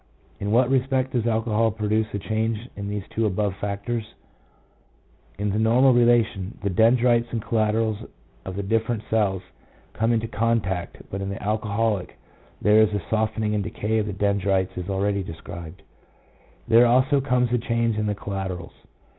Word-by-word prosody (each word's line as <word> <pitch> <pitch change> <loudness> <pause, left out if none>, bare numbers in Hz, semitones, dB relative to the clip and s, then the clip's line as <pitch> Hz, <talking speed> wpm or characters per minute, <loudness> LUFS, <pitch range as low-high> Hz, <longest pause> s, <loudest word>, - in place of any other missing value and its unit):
In 100 - -3
what 125 +3 +3
respect 130 0 +1
does 120 -2 0
alcohol 115 0 +1
produce 110 0 0
a - - -2
change 110 +2 -2
in 100 0 -5
these 105 -1 -3
two 110 -1 +1
above 100 0 -1
factors? 105 +3 -4 1.2
In 100 0 -1
the 105 - 0
normal 125 +4 +5
relation, 115 -5 +2
the 100 - 0
dendrites 120 +3 +4
and 115 - -2
collaterals 110 -1 0 0.4
of 95 - -6
the 100 - -3
different 110 +2 0
cells 100 -4 +1 0.5
come 115 +1 +1
into 115 -1 0
contact, 105 -5 -1
but 95 - -4
in 95 - -3
the 100 - -6
alcoholic 105 -1 -1 0.4
there 105 +1 +5
is 110 -1 +3
a 100 - -2
softening 110 -1 0
and 105 -1 0
decay 110 +1 -1
of 105 - -1
the 105 - -3
dendrites 100 -1 0
as 90 +1 -5
already 100 +1 0
described; 80 -1 -9 0.8
there 120 +2 +6
also 130 +4 +3
comes 125 -2 +1
a 125 - +3
change 115 -1 0
in 105 - 0
the 105 - -1
collaterals. 95 -4 -5
110 Hz, 165 wpm, -24 LUFS, 100-115 Hz, 1.2 s, there